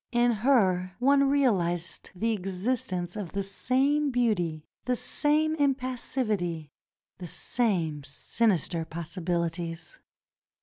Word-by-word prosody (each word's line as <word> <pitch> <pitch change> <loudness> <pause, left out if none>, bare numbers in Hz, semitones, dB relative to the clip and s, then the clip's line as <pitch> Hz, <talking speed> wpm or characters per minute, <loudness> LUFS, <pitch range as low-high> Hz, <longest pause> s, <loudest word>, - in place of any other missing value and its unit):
In 240 0 +3
her 200 -7 +2
one 275 +2 +4
realized 175 -12 0
the 225 +5 0
existence 185 -2 -1
of 205 -6 -6
the 200 0 -1
same 275 +8 +1
beauty, 185 - 0 0.2
the 250 - +1
same 305 +5 +1
impassivity, 250 - -1 0.5
the 180 - -6
same 170 - 0
sinister 170 +3 0
possibilities. 170 - -4
200 Hz, 95 wpm, -28 LUFS, 175-255 Hz, 0.5 s, one